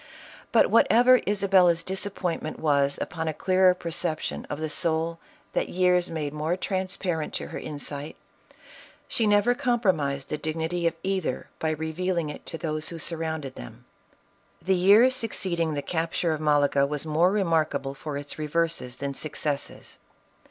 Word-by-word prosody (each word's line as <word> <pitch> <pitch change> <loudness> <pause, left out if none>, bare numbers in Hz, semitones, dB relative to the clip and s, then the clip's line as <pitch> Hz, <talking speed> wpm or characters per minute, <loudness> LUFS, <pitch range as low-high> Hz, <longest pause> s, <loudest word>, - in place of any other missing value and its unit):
But - - +4
whatever 245 +2 +6
Isabella's 190 -4 +4
disappointment 185 -4 -3
was 140 -2 +2
upon 160 -1 -3
a 155 - -2
clearer 185 +1 +4
perception 170 -2 -3
of 145 - -4
the 155 - -2
soul 165 +1 0 0.3
that - - 0
years 180 -1 +2
made 150 -3 -3
more 155 +4 -1
transparent 185 -4 -2
to - - -4
her - - -5
insight, 145 0 -6 0.9
she 225 - 0
never 205 +3 +4
com 245 -2 0
promised 145 - 0
the 150 - -3
dignity 160 +2 -1
of 165 - -1
either 190 -9 -2
by 160 - 0
revealing 160 +1 -2
it - - -11
to 165 - -5
those 155 -1 -3
who 170 - -7
surrounded 160 -4 -4
them. - - -11 0.7
The 190 - +1
year 200 +8 +6
succeeding 185 -10 -1
the 145 - -3
capture 165 0 -1
of 155 -1 -2
Malaga, 145 -2 +3
was 150 +1 -3
more 160 +4 +3
remarkable 160 -8 0
for 145 +1 -5
its 145 +1 -6
reverses 155 -4 -1
than 140 0 -3
successes. 145 0 -5
165 Hz, 150 wpm, -26 LUFS, 150-185 Hz, 0.9 s, whatever